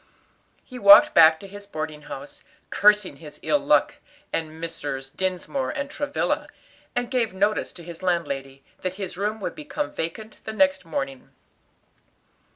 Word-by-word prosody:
He 255 Hz, -2 st, -9 dB
walked 200 Hz, -1 st, +9 dB
back 160 Hz, -1 st, +7 dB
to 200 Hz, -, -10 dB
his 200 Hz, +1 st, -11 dB
boarding 155 Hz, -4 st, -5 dB
house, 285 Hz, -, -9 dB, 0.3 s
cursing 210 Hz, -7 st, +4 dB
his 150 Hz, 0 st, -12 dB
ill 295 Hz, -, +2 dB
luck 290 Hz, 0 st, +2 dB, 0.4 s
and 160 Hz, -1 st, -3 dB
Messrs. 145 Hz, -5 st, -5 dB
Dinsmore 190 Hz, -, -2 dB
and 280 Hz, -1 st, -4 dB
Travilla, 290 Hz, -1 st, -1 dB, 0.5 s
and 245 Hz, 0 st, -1 dB
gave 230 Hz, -7 st, 0 dB
notice 205 Hz, +3 st, +1 dB
to 175 Hz, -, -10 dB
his 170 Hz, 0 st, -9 dB
landlady 140 Hz, -7 st, -2 dB, 0.2 s
that 185 Hz, 0 st, -2 dB
his 190 Hz, -2 st, -5 dB
room 210 Hz, +4 st, -2 dB
would -, -, -3 dB
become 300 Hz, -1 st, -4 dB
vacant 215 Hz, +7 st, -5 dB
the 220 Hz, -, -5 dB
next 280 Hz, -3 st, +2 dB
morning. 135 Hz, -5 st, -4 dB
190 Hz, 150 wpm, -24 LUFS, 160-245 Hz, 0.5 s, walked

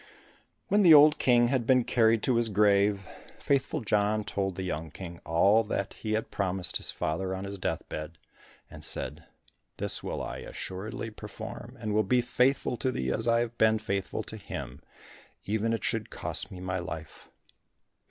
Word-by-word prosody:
When 205 Hz, +1 st, +3 dB
the 170 Hz, -5 st, +9 dB
old 150 Hz, +1 st, +7 dB
King 120 Hz, -2 st, +4 dB
had 125 Hz, -3 st, 0 dB
been 125 Hz, -2 st, +5 dB
carried 115 Hz, -2 st, +3 dB
to 125 Hz, -3 st, +2 dB
his 115 Hz, -1 st, +3 dB
grave, 100 Hz, -1 st, +3 dB, 0.3 s
Faithful 140 Hz, +2 st, 0 dB
John 105 Hz, 0 st, +1 dB
told 95 Hz, -2 st, -2 dB
the 95 Hz, -, -4 dB
young 80 Hz, -3 st, -3 dB
King 85 Hz, +2 st, -9 dB
all 100 Hz, +7 st, +4 dB
that 100 Hz, -1 st, -2 dB
he 110 Hz, -1 st, -4 dB
had 110 Hz, 0 st, -2 dB
promised 95 Hz, -2 st, -1 dB
his -, -, -4 dB
father 95 Hz, +4 st, -2 dB
on 95 Hz, -, -5 dB
his 100 Hz, 0 st, -6 dB
deathbed, 80 Hz, -2 st, -4 dB, 0.5 s
and -, -, -11 dB
said, 75 Hz, +4 st, -2 dB, 0.5 s
"This -, -, +2 dB
will -, -, -4 dB
I -, -, -5 dB
assuredly 105 Hz, +4 st, -6 dB
perform, 120 Hz, +4 st, -9 dB
and 110 Hz, -2 st, -3 dB
will 110 Hz, -, +4 dB
be 115 Hz, +5 st, +2 dB
faithful 125 Hz, +1 st, +1 dB
to 130 Hz, -, 0 dB
thee 65 Hz, -, -2 dB
as -, -, -2 dB
I 115 Hz, 0 st, +4 dB
have 120 Hz, 0 st, -4 dB
been 110 Hz, 0 st, +5 dB
faithful 100 Hz, -3 st, -3 dB
to -, -, -8 dB
him, -, -, -7 dB, 0.6 s
even 110 Hz, +2 st, 0 dB
if 115 Hz, -, +1 dB
it -, -, -16 dB
should -, -, -1 dB
cost -, -, -3 dB
me 90 Hz, -, -8 dB
my 95 Hz, 0 st, -2 dB
life." 80 Hz, -3 st, -8 dB
105 Hz, 180 wpm, -29 LUFS, 95-120 Hz, 0.6 s, the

